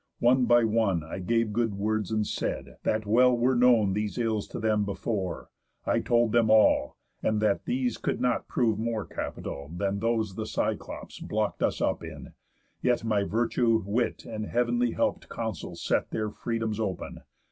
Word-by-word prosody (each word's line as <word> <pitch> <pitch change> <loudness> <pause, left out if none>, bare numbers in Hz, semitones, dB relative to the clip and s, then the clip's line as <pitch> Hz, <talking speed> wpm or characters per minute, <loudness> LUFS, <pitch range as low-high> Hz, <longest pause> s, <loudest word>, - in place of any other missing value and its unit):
One 125 +1 +4
by 120 0 +5
one 110 -7 +1
I 80 +5 -6
gave 115 +3 0
good 115 -2 0
words, 105 0 -1
and 110 -1 0
said: - - -4
That 110 0 0
well 125 +4 +4
were 125 +2 +3
known 120 -5 +4
These 105 +1 -2
ills 110 -3 0
to - - -6
them 110 -1 +2
before, 100 -2 -3 0.3
I - - +2
told 120 -2 +2
them 115 -1 +3
all, 110 0 +4 0.2
And 110 -1 +1
that 105 -2 +1
these 250 0 -1
could - - -1
not 125 -2 0
prove 110 -4 +1
more 115 -2 -2
capital 70 +1 -6
Than 100 +3 -1
those 110 -2 0
the 110 +2 -4
Cyclops - - -3
block'd 105 -1 -2
us - - 0
up - - 0
in, - - -9 0.5
yet 125 -2 +1
My 110 -3 +1
virtue, 115 +1 +1
wit, 115 +4 -1
and 110 -2 -5
heav'n 120 0 +1
help'd - - -1
counsels - - -5
set - - +1
Their 110 -1 -2
freedoms 115 -1 -3
open. 100 -5 -3
110 Hz, 170 wpm, -28 LUFS, 105-120 Hz, 0.5 s, by